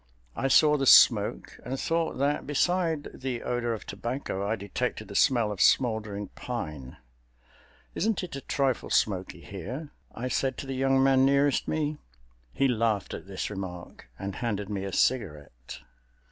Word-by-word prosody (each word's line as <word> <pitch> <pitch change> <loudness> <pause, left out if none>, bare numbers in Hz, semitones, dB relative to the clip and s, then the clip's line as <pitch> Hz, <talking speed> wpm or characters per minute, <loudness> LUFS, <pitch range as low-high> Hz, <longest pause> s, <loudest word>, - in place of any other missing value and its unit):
I 135 - 0
saw 150 +3 +5
the 135 -1 0
smoke - - +5
and 130 +1 -4
thought 165 0 -1
that 140 +2 0
beside 165 +1 0
the 130 -3 -3
odor 120 -1 -1
of 110 - -10
tobacco 115 -1 -4
I 105 +2 0
detected 100 -2 -4
the - - -8
smell 115 -5 +3
of 100 - -4
smoldering 110 -4 +2
pine. 75 - -6 1.0
"Isn't 215 0 0
it 175 -5 -6
a 140 - -6
trifle 135 -3 -1
smoky 95 -3 0
here?" 120 - -7 0.2
I 125 - -3
said 130 0 -1
to - - -6
the 135 - -4
young 135 0 +2
man 135 -1 +4
nearest 140 0 +3
me. 155 -1 -1 0.5
He 135 - +2
laughed 115 -5 0
at - - -7
this 95 +1 -4
remark 90 -9 -8
and 95 0 -5
handed 105 -4 -3
me 100 -1 -3
a 100 - -4
cigarette. 75 - -2
120 Hz, 160 wpm, -28 LUFS, 100-135 Hz, 1.0 s, saw